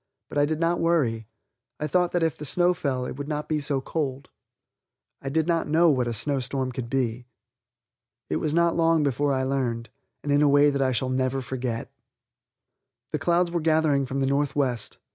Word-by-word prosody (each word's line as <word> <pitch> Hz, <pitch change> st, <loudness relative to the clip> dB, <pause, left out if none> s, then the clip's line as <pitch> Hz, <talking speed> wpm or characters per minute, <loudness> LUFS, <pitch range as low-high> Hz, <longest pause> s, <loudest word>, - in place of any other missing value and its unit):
But 145 Hz, -, -1 dB
I 145 Hz, -, +3 dB
did 155 Hz, 0 st, -2 dB
not 170 Hz, +1 st, +1 dB
worry; 125 Hz, -10 st, +1 dB, 0.5 s
I 150 Hz, -, -2 dB
thought 180 Hz, +3 st, +1 dB
that 175 Hz, -1 st, +1 dB
if 160 Hz, -2 st, +1 dB
the -, -, -9 dB
snow 175 Hz, +5 st, +2 dB
fell 140 Hz, -8 st, -2 dB
it 125 Hz, -, -6 dB
would 145 Hz, 0 st, -5 dB
not 150 Hz, 0 st, -3 dB
be 155 Hz, -1 st, 0 dB
so 140 Hz, -2 st, -1 dB
cold. 140 Hz, -2 st, -4 dB, 0.9 s
I 135 Hz, -, -4 dB
did 160 Hz, +2 st, +1 dB
not 165 Hz, -1 st, 0 dB
know 165 Hz, +2 st, +4 dB
what 125 Hz, -3 st, 0 dB
a -, -, -1 dB
snow 135 Hz, +5 st, -1 dB
storm 130 Hz, 0 st, -2 dB
could 120 Hz, -1 st, -5 dB
be. 125 Hz, -2 st, -1 dB, 1.0 s
It 75 Hz, -, -1 dB
was 155 Hz, -, -1 dB
not 170 Hz, 0 st, +3 dB
long 165 Hz, -2 st, +3 dB
before 145 Hz, +1 st, +1 dB
I 130 Hz, -1 st, 0 dB
learned, 125 Hz, -4 st, -2 dB, 0.3 s
and 145 Hz, -, -2 dB
in 145 Hz, +1 st, +4 dB
a 150 Hz, -, +5 dB
way 145 Hz, +1 st, +5 dB
that 140 Hz, -1 st, -1 dB
I 130 Hz, -1 st, +2 dB
shall 130 Hz, +1 st, -1 dB
never 130 Hz, +1 st, 0 dB
forget. 125 Hz, -2 st, -4 dB, 1.2 s
The 155 Hz, -, -1 dB
clouds 170 Hz, +2 st, +2 dB
were 170 Hz, -1 st, -1 dB
gathering 155 Hz, -4 st, +2 dB
from 135 Hz, +2 st, -2 dB
the -, -, +2 dB
northwest. 135 Hz, -3 st, -1 dB
140 Hz, 200 wpm, -25 LUFS, 130-160 Hz, 1.2 s, a